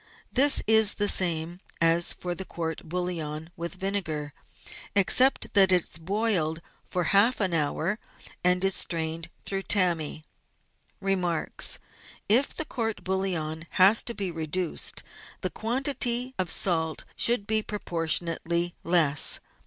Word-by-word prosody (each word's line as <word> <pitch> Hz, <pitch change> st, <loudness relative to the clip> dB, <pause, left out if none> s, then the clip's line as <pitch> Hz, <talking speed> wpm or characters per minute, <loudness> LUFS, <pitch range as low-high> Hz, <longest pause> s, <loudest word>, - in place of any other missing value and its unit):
— -, -, -36 dB
This 285 Hz, 0 st, +7 dB
is 220 Hz, -1 st, +6 dB
the 205 Hz, -, 0 dB
same 170 Hz, -2 st, +3 dB, 0.2 s
as 165 Hz, +1 st, +2 dB
for 180 Hz, -1 st, -3 dB
the 190 Hz, -, -6 dB
court 165 Hz, -3 st, -6 dB
bouillon 165 Hz, -3 st, -4 dB
with 170 Hz, +1 st, -6 dB
vinegar, 175 Hz, -7 st, -3 dB, 0.6 s
except 250 Hz, +7 st, +3 dB
that 195 Hz, -2 st, +5 dB
it 180 Hz, -2 st, +3 dB
is -, -, -5 dB
boiled 180 Hz, -3 st, -1 dB, 0.3 s
for 180 Hz, -, -2 dB
half 215 Hz, +6 st, +4 dB
an 190 Hz, -4 st, 0 dB
hour 165 Hz, +6 st, -1 dB, 0.4 s
and 180 Hz, +1 st, +2 dB
is 195 Hz, 0 st, +4 dB
strained 165 Hz, -1 st, -1 dB, 0.2 s
through 195 Hz, -1 st, -2 dB
tammy. 170 Hz, -6 st, 0 dB, 0.8 s
Remarks. 180 Hz, -4 st, -1 dB, 0.3 s
— -, -, -22 dB
If 245 Hz, +7 st, +3 dB
the 315 Hz, -, -1 dB
court 225 Hz, -6 st, -4 dB
bouillon 170 Hz, -4 st, -3 dB
has 195 Hz, +4 st, +6 dB
to 235 Hz, -, -5 dB
be 195 Hz, -3 st, -4 dB
reduced 165 Hz, +1 st, -2 dB, 0.4 s
the -, -, -3 dB
quantity 250 Hz, +1 st, +1 dB
of 185 Hz, -2 st, 0 dB
salt 160 Hz, -4 st, 0 dB
should 235 Hz, -3 st, +2 dB
be 220 Hz, +1 st, +1 dB
proportionately 170 Hz, -3 st, -2 dB
less. 160 Hz, -5 st, +2 dB
180 Hz, 135 wpm, -26 LUFS, 165-205 Hz, 0.8 s, This